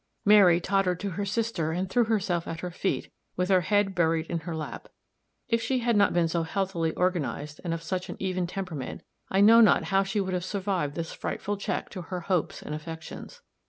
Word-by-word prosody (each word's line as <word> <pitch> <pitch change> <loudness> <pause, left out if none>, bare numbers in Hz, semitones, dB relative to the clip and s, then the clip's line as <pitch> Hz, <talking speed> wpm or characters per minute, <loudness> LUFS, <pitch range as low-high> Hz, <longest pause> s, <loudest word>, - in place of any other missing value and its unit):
Mary 200 -5 +7
tottered 185 -1 +1
to 200 -1 -3
her 200 +3 -3
sister 205 -6 -1
and 180 +3 -1
threw 240 +5 +2
herself 195 -6 0
at 165 0 -5
her 180 - -4
feet, 190 +2 -2 0.3
with 180 +1 0
her 185 -2 +5
head 205 +3 +2
buried 165 -2 +1
in 170 - 0
her 165 +1 -5
lap; 155 - -6 0.6
if 230 -1 +1
she 260 +3 0
had 235 -1 +2
not 205 -1 +4
been 175 -1 +2
so 165 +1 0
healthily 170 -1 -1
organized, 155 -5 -1
and 170 - -2
of 165 0 -3
such 185 0 -3
an - - -5
even 185 -2 -1
temperament, 175 -8 -5 0.3
I 195 - +2
know 225 +3 +8
not 220 - +5
how 195 - +5
she 195 +2 -1
would 190 -1 -1
have 180 -1 -1
survived 185 -6 -2
this 165 -1 -4
frightful 205 - -3
check 200 - -3
to 185 - -6
her 180 +1 -5
hopes 180 -2 -1
and 150 - -5
affections. 160 - -8
185 Hz, 210 wpm, -27 LUFS, 165-200 Hz, 0.6 s, know